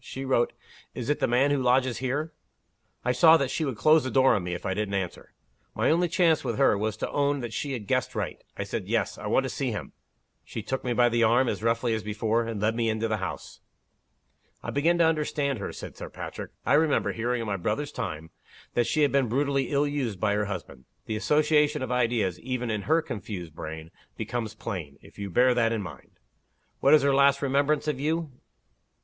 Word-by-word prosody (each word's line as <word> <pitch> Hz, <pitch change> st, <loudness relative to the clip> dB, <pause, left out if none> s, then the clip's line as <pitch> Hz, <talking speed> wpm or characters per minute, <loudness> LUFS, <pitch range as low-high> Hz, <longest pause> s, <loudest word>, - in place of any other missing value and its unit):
She 135 Hz, +1 st, -6 dB
wrote, 125 Hz, -2 st, +2 dB, 0.4 s
'Is 125 Hz, +3 st, -2 dB
it 150 Hz, -, -1 dB
the -, -, +2 dB
man 130 Hz, +4 st, +3 dB
who 140 Hz, -2 st, +1 dB
lodges 125 Hz, -1 st, +2 dB
here?' 140 Hz, +5 st, -2 dB, 0.7 s
I 125 Hz, -, +3 dB
saw 160 Hz, +6 st, +7 dB
that 135 Hz, -4 st, -1 dB
she 160 Hz, -, -1 dB
would 135 Hz, -7 st, -2 dB
close 155 Hz, +7 st, +5 dB
the 130 Hz, -, -2 dB
door 130 Hz, 0 st, +4 dB
on 100 Hz, -, 0 dB
me 90 Hz, 0 st, -3 dB
if -, -, -8 dB
I 95 Hz, -, 0 dB
didn't 100 Hz, 0 st, -2 dB
answer. 95 Hz, -2 st, -4 dB, 0.4 s
My -, -, +2 dB
only 175 Hz, +2 st, +3 dB
chance 170 Hz, -2 st, +2 dB
with -, -, -2 dB
her 135 Hz, -5 st, +4 dB
was 110 Hz, +1 st, -2 dB
to -, -, -3 dB
own 145 Hz, -1 st, +1 dB
that 120 Hz, -2 st, -5 dB
she 140 Hz, +4 st, -3 dB
had 115 Hz, -5 st, -5 dB
guessed -, -, -1 dB
right. -, -, -4 dB
I -, -, -2 dB
said -, -, -4 dB
'Yes. -, -, -1 dB
I -, -, -5 dB
want -, -, +2 dB
to -, -, -3 dB
see -, -, -2 dB
him.' -, -, -5 dB, 0.5 s
She 115 Hz, -, -6 dB
took 130 Hz, +4 st, -3 dB
me 125 Hz, -, -1 dB
by 120 Hz, 0 st, +4 dB
the 120 Hz, 0 st, +1 dB
arm, 120 Hz, +3 st, +4 dB
as -, -, -2 dB
roughly 115 Hz, +1 st, +1 dB
as 110 Hz, -, -1 dB
before 110 Hz, +2 st, -1 dB
and 115 Hz, -3 st, -4 dB
led 110 Hz, +2 st, +1 dB
me 115 Hz, -1 st, +1 dB
into 110 Hz, +1 st, 0 dB
the 110 Hz, -1 st, -1 dB
house." 95 Hz, -2 st, -6 dB, 1.0 s
"I -, -, -4 dB
begin 165 Hz, +5 st, +2 dB
to 170 Hz, -, +4 dB
understand 150 Hz, -4 st, 0 dB
her," 100 Hz, -, -4 dB
said -, -, -9 dB
Sir -, -, -8 dB
Patrick. -, -, -7 dB, 0.2 s
"I 125 Hz, -, +2 dB
remember 150 Hz, 0 st, +3 dB
hearing, 120 Hz, +2 st, -1 dB
in 115 Hz, -, -3 dB
my 100 Hz, -2 st, -2 dB
brother's 110 Hz, +11 st, -2 dB
time, 80 Hz, +1 st, -5 dB, 0.4 s
that 120 Hz, -1 st, +1 dB
she 155 Hz, -, +2 dB
had 145 Hz, -, +3 dB
been 135 Hz, -4 st, +2 dB
brutally 135 Hz, +1 st, 0 dB
ill 145 Hz, 0 st, +2 dB
used 135 Hz, -9 st, -2 dB
by 105 Hz, -1 st, +1 dB
her 105 Hz, 0 st, 0 dB
husband. 85 Hz, -10 st, -7 dB, 0.2 s
The 110 Hz, -, -3 dB
association 150 Hz, +3 st, +2 dB
of 130 Hz, -, -4 dB
id 125 Hz, -2 st, +2 dB
eas, 95 Hz, -7 st, -1 dB
even 125 Hz, -1 st, -3 dB
in 105 Hz, +4 st, -4 dB
her 160 Hz, +1 st, +4 dB
confused 95 Hz, -6 st, -6 dB
brain, 80 Hz, +1 st, -7 dB, 0.3 s
becomes 115 Hz, -3 st, -4 dB
plain, 85 Hz, -12 st, -6 dB
if -, -, -16 dB
you 100 Hz, -1 st, -4 dB
bear 125 Hz, +7 st, +4 dB
that 115 Hz, -2 st, +2 dB
in 110 Hz, -3 st, -1 dB
mind. 90 Hz, -, -11 dB, 0.6 s
What 140 Hz, +3 st, +6 dB
is 150 Hz, -, +3 dB
her 140 Hz, -1 st, +3 dB
last 140 Hz, +1 st, +4 dB
remembrance 140 Hz, +3 st, +1 dB
of 145 Hz, -4 st, -1 dB
you? 160 Hz, +1 st, -1 dB
125 Hz, 225 wpm, -27 LUFS, 110-140 Hz, 1.0 s, saw